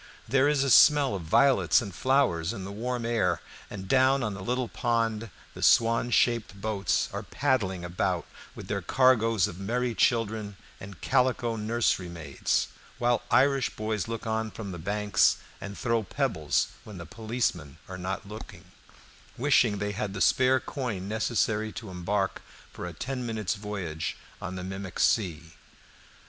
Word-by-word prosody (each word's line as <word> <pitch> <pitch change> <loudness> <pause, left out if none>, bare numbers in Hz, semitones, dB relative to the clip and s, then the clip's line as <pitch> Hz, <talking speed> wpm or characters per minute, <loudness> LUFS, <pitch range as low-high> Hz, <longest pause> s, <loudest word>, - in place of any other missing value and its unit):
There 135 +4 +3
is 145 -2 +2
a 135 - +1
smell 145 -2 +6
of 95 - -3
violets 130 - +4
and 100 -7 -6
flowers 120 - +1
in 95 - -6
the 100 - -6
warm 120 +3 -3
air, 100 -7 +1 0.3
and 95 -2 -7
down 135 +1 +4
on 105 -2 -2
the 100 - -7
little 125 +4 -1
pond 115 -1 -1 0.2
the - - -10
swan 115 +1 +4
shaped 115 -4 +1
boats 100 -1 0
are - - -3
paddling 95 -8 -1
about 90 +1 -1 0.3
with - - -9
their 100 -1 -2
cargoes 115 -2 +3
of 90 -3 -8
merry 120 +5 -1
children 110 -3 0 0.2
and 95 0 -10
calico 120 -2 +1
nursery 110 -4 0
maids, 80 -5 -1 0.3
while 120 -1 +2
the - - +3
Irish 135 +1 +3
boys 110 -2 -2
look 115 0 -5
on 110 0 -1
from 105 -2 -7
the 85 - -7
banks 100 +3 +2 0.2
and 100 0 -7
throw 115 -1 +1
pebbles 100 - 0
when 105 -3 -10
the 85 - -7
policemen 110 - -3
are 95 0 -7
not 95 +3 -4
looking, 110 +3 -10 0.7
wishing 120 -5 +3
they 105 +1 -2
had 100 -1 -4
the - - -4
spare 130 0 +4
coin 115 -11 -4
necessary 110 0 0
to 115 -4 -7
embark 95 +2 -1 0.3
for 90 - -6
a 85 - -7
ten 125 - -4
minutes' 110 -5 -2
voyage 95 -7 -4 0.2
on 95 0 -5
the 90 - -5
mimic 95 -1 -6
sea. 85 -6 +1
110 Hz, 160 wpm, -28 LUFS, 95-120 Hz, 0.7 s, smell